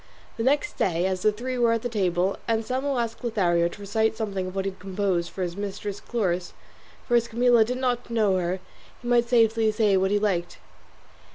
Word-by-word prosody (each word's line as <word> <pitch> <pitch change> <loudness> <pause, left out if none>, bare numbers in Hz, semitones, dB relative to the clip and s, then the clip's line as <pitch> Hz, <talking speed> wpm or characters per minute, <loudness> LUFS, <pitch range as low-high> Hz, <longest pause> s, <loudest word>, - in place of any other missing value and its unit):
The - - -4
next 290 +3 +1
day 175 -1 +1
as 190 -1 -1
the 215 - +4
three 250 +4 -4
were 235 -1 +4
at 230 +1 -2
table 185 -2 0
Anselmo 255 +5 0
asked 230 0 -3
Lothario 175 -7 +2
to 205 - -10
recite 220 +2 0
something 195 -4 -2
of 185 - -8
what 195 0 -1
he 195 - -1
had 190 - -19
composed 185 -2 -1
for 190 - -4
his 175 -1 -3
mistress 205 0 -5
Chloris; 185 -7 -2 0.5
for 240 - +2
as 235 0 +3
Camilla 235 0 +4
did 250 +3 -3
not 250 -2 -1
know 215 -5 +2
her, 180 +1 -1 0.4
he - - -6
might 240 -1 +3
safely 225 -2 +3
say 210 -2 +2
what 190 +1 +2
he 205 - +2
liked. 195 -5 -1
215 Hz, 200 wpm, -25 LUFS, 190-235 Hz, 0.5 s, the